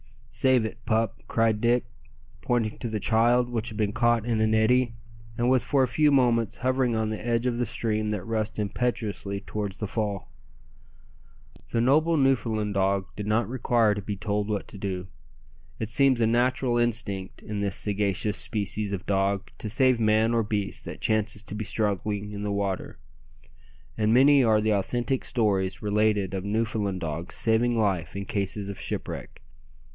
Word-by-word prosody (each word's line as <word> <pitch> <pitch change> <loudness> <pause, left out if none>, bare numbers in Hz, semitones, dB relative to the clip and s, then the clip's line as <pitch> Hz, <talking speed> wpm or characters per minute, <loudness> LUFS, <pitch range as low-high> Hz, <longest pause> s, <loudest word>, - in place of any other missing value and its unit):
"Save 125 0 +3
it, 115 +1 -6
pup," 110 -2 0
cried 115 -2 +1
Dick, 120 +1 +2 0.6
pointing 115 -3 -1
to 120 - -2
the 110 -2 -3
child, 120 +3 +3
which 115 -3 -2
had 110 - -5
been 105 -2 0
caught 120 0 +2
in 115 -2 0
an 110 0 +2
eddy, 120 +2 +3 0.4
and 120 - +1
was 130 -2 +3
for 140 -2 +2
a - - +2
few 150 +5 +3
moments 120 -5 +2
hovering 130 -1 +1
on 110 -1 0
the 110 - -5
edge 120 0 0
of 120 -1 0
the 120 - +1
stream 110 -1 -1
that 105 -4 -2
rushed 110 0 -2
impetuously 105 -2 -2
towards 105 -2 -4
the 105 - -3
fall. 100 -2 -3 1.4
The 115 - 0
noble 155 +6 +3
Newfoundland 115 -7 +1 0.4
did 105 -1 -5
not 110 0 +1
require 120 -3 +2
to 105 - -4
be 100 +1 -4
told 105 +1 -2
what 105 -2 -2
to - - -9
do. 95 -2 -4 0.7
It 110 - -3
seems 135 -1 +4
a - - +4
natural 125 +1 +1
instinct 105 -5 -2
in 105 -1 -4
this 100 -2 -1
sagacious 105 0 0
species 105 -1 -2
of 95 -1 -4
dog 100 0 0
to 110 - -3
save 130 +2 +3
man 110 +1 +3
or 115 - +3
beast 105 -2 -3
that - - -8
chances 110 0 0
to - - -9
be 110 0 -4
struggling 105 -1 -1
in 100 0 -6
the 105 0 -2
water, 100 -6 -3 1.0
and 110 +1 +2
many 135 +2 +6
are 110 -2 +4
the 110 0 +2
authentic 120 +6 -1
stories 100 -5 0
related 105 -2 +1
of 95 -1 -3
Newfoundland 105 -3 -1
dogs 80 +2 -4
saving 115 +1 +2
life 95 -7 0
in 100 0 -4
cases 100 +1 -3
of 100 - -7
shipwreck. - - -5
110 Hz, 175 wpm, -26 LUFS, 100-120 Hz, 1.4 s, many